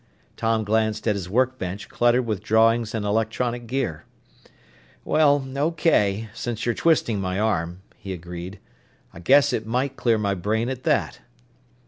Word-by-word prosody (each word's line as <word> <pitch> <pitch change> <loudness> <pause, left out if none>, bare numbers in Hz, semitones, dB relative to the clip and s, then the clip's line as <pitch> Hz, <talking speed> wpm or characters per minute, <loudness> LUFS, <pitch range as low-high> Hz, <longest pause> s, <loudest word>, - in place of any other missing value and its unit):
Tom 115 -1 0
glanced 110 +1 0
at 105 - +3
his 95 -3 -5
workbench 110 -4 -1
cluttered 120 +1 +2
with 105 -4 -2
drawings 115 +1 +2
and 105 -2 -2
electronic 115 +3 -1
gear. 125 - -2 1.0
"Well, 145 -3 +3
okay, 140 - +1
since 120 -2 -4
you're 120 - +1
twisting 120 -11 +1
my 95 +1 -2
arm," 90 -4 -1
he 95 - -8
agreed. 90 +2 -7 0.6
"I - - -11
guess 140 +8 +4
it 110 -2 -2
might 130 +4 -1
clear 115 -2 +2
my 100 -2 0
brain 110 +6 -1
at 130 -1 -6
that." - - 0
110 Hz, 145 wpm, -24 LUFS, 100-125 Hz, 1.0 s, guess